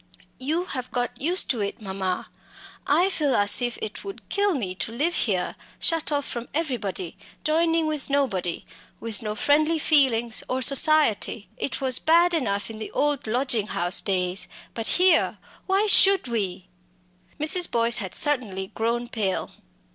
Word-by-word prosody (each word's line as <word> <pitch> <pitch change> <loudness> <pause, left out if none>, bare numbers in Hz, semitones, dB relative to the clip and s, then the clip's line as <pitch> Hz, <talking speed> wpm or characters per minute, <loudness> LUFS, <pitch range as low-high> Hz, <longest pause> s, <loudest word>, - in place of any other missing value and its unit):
"You 315 +7 -2
have 255 -7 -4
got 245 +1 -3
used 350 +6 +1
to 245 - -3
it, 200 - -4
mamma! 190 -3 -4 0.6
I 330 +6 +3
feel 295 -6 0
as 205 +4 +2
if 240 -1 -2
it 215 - -6
would 395 -1 -9
kill 400 -2 +1
me 195 -9 -3
to 195 - -4
live 295 +9 0
here, 190 - -1 0.2
shut 330 -2 +1
off 285 -1 -1
from 240 0 -6
everybody 230 - -3 0.3
joining 325 +1 +1
with 305 -3 -3
nobody 210 -12 -1 0.3
with 225 -3 -3
no 210 -1 -4
friendly 305 +7 +2
feelings 255 -7 +3
or 260 0 -1
society. 275 -7 +2
It 275 - -4
was 260 -2 +2
bad 340 +2 +3
enough 225 -9 -1
in 215 - -10
the 220 - -6
old 290 -4 -1
lodging 235 -2 0
house 175 0 +1
days; 185 -1 -1 0.3
but 225 -1 -3
here 360 -2 +3 0.3
why 390 +2 +2
should 390 -5 +5
we?" 195 -6 -3 0.7
Mrs. 345 +4 +3
Boyce 235 0 +4
had 190 -5 0
certainly 215 -10 +3
grown 235 +2 -2
pale. 210 -6 -3
250 Hz, 155 wpm, -24 LUFS, 210-310 Hz, 0.7 s, should